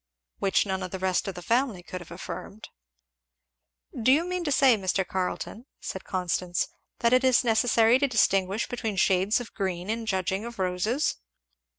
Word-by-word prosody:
Which 195 +1 +2
none 190 -1 -2
of 185 - -4
the 190 - -5
rest 185 0 0
of 195 - -4
the 175 - -8
family 230 -5 0
could 180 0 -7
have 175 - -12
affirmed. 215 +2 -8 1.3
"Do 255 - +4
you 310 +5 +4
mean 360 0 -2
to 290 - 0
say, 270 -3 +5
Mr. 190 -1 0
Carleton," 190 +6 -4
said 190 - -6
Constance, 180 -1 -1 0.3
"that 235 +1 +3
it 255 +1 +4
is 260 -1 +4
necessary 230 +1 +4
to 280 - +2
distinguish 195 -3 +2
between 225 -4 -3
shades 190 +4 +3
of 245 - -9
green 185 0 -2
in 225 0 -4
judging 190 0 -1
of 235 0 -8
roses?" 190 +9 0
205 Hz, 175 wpm, -27 LUFS, 185-240 Hz, 1.3 s, say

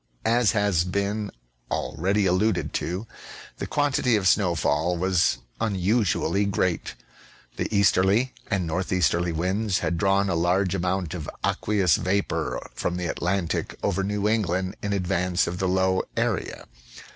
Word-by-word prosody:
As 115 0 +3
has 100 -6 +2
been 100 +3 -2 0.4
already 100 +4 0
alluded 95 +2 +1
to, 90 +6 -3 0.5
the - - -4
quantity 140 -4 +1
of 100 -3 +1
snowfall 85 -3 +2
was 90 -7 +2 0.2
unusually 100 -2 +1
great. 95 -3 -1 0.6
The - - -2
easterly 100 +4 +3 0.2
and 100 -4 0
northeasterly 85 0 0
winds 95 +5 0
had 85 - -1
drawn 100 +2 +2
a 95 - 0
large 90 +3 +1
amount 90 -2 -1
of 80 -5 -5 0.2
aqueous 100 -6 +2
vapor 100 +2 -1
from 90 - -2
the 90 - -3
Atlantic 85 +1 -1
over 100 -1 +1
New 105 +1 -1
England 95 -4 0
in 100 - -2
advance 90 -1 +1
of 90 +1 -4
the 95 - 0
low 95 0 +2 0.2
area. - - -1
95 Hz, 135 wpm, -25 LUFS, 90-100 Hz, 0.6 s, As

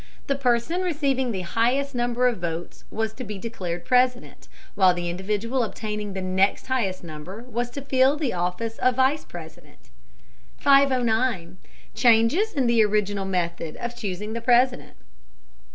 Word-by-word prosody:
The 275 - 0
person 265 +6 +1
receiving 280 -8 0
the 190 -4 -3
highest 245 +10 0
number 245 0 +1
of 240 -5 -1
votes 170 0 -5
was 220 -1 -2
to 255 - -7
be 210 -3 -6
declared 185 -5 -5
President, 250 0 +1 0.3
while 185 -3 +4
the 175 -1 -3
individual 210 +7 -2
obtaining 210 -2 -4
the 190 -1 -4
next 190 +2 +1
highest 230 -9 -1
number 170 +7 -8
was 240 0 -3
to 275 +3 -7
fill 270 +1 +3
the 290 -5 -1
office 180 +6 -3
of 255 -1 +2
Vice 265 +4 +2
President. 160 - -13 0.7
509. 245 -9 +2 0.4
CHANGES 235 - +3
IN 270 -4 +1
THE 235 -2 +4
ORIGINAL 205 -2 0
METHOD 170 -4 -2
OF 240 0 -5
CHOOSING 210 -2 -4
THE 230 - -4
PRESIDENT. 250 +1 +2
230 Hz, 150 wpm, -24 LUFS, 190-255 Hz, 0.7 s, while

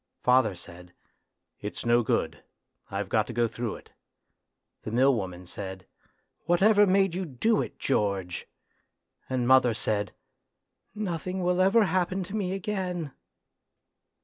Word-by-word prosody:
Father 125 -5 +4
said, 90 0 -12 0.6
"It's 105 +3 -6
no 120 +1 +4
good, 115 - -1 0.5
I've 100 0 -3
got 110 +2 +1
to 120 - -6
go 120 0 +2
through 115 0 -4
it;" - - -15 0.9
the - - -6
mill 130 +5 +4
woman 90 -5 -4
said, 95 0 -7 0.3
" - - -46
Whatever 205 +4 +5
made 195 -1 +3
you 185 +2 -2
do 180 - +1
it, - - -6
George? 100 -8 -1 0.4
" - - -44
And 125 -2 0
mother 130 -3 +5
said, 105 -2 -1 0.5
" - - -49 0.2
Nothing 180 +3 -3
will 180 +1 +2
ever 205 +4 +5
happen 185 0 0
to 190 +4 -7
me 190 -3 -1
again 185 -6 -3
130 Hz, 145 wpm, -27 LUFS, -, 0.9 s, Whatever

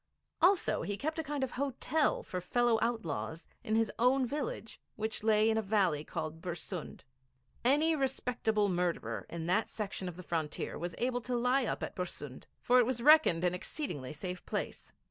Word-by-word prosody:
Also, 360 +2 +4
he 205 0 -3
kept 315 +5 -2
a - - 0
kind 290 -2 -2
of 265 - -2
hotel 280 +3 0
for 180 - -4
fellow 240 +4 +2
outlaws 165 - -2 0.2
in 215 - 0
his 225 -1 +2
own 255 +2 +4
village, 250 -4 -4
which 220 +1 -3
lay 215 0 +4
in 220 0 +3
a - - +1
valley 195 -8 +1
called 155 +1 -5
Bersund. 175 -1 -5 0.6
Any 300 +6 +4
respectable 240 -6 0
murderer 180 -2 -1
on 170 -1 -5
that 185 +6 +1
section 195 -3 -4
of 175 - -10
the 185 - -8
frontier 160 -3 -2
was 175 0 -4
sure 245 0 0
to 245 +1 -2
lie 250 +2 +2
up - - -2
at - - -5
Bersund, 145 -7 -6
for 250 +1 +4
it 245 - +5
was 245 -2 -1
reckoned 295 - +6
an 180 0 +2
exceedingly 180 - -4
safe 180 +4 -5
place. - - -4
220 Hz, 180 wpm, -32 LUFS, 180-255 Hz, 0.6 s, reckoned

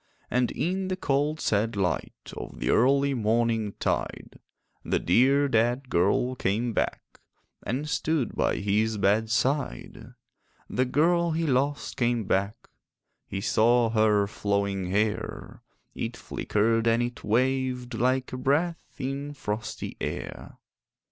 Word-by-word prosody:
And 125 0 +2
in 185 +2 -2
the 185 - -1
cold 150 -2 0
sad 110 -1 0
light 95 -3 -3
Of - - -8
the - - 0
early 140 +3 +3
morningtide, 115 -2 -1 0.4
The - - 0
dear 135 +9 +3
dead 120 +2 +1
girl 100 +8 +2
came 115 0 -1
back - - -3 0.4
And 135 +5 -3
stood 150 -4 -1
by - - +1
his 105 +2 0
bedside. 110 - 0 0.5
The 130 - 0
girl 170 +5 +2
he 165 +1 0
lost 140 +1 0
came 120 -3 +1
back: 100 +2 0 0.7
He 95 - -4
saw 115 +2 +3
her 110 -2 +3
flowing 100 -2 -1
hair; 105 +3 -2 0.3
It - - -4
flickered 115 +2 0
and 115 +1 +3
it 120 0 -5
waved 125 +1 0
Like 130 +3 0
a - - -3
breath 150 +6 0
in 140 +2 -4
frosty 110 -3 -5
air. - - -5
120 Hz, 120 wpm, -27 LUFS, 110-135 Hz, 0.7 s, early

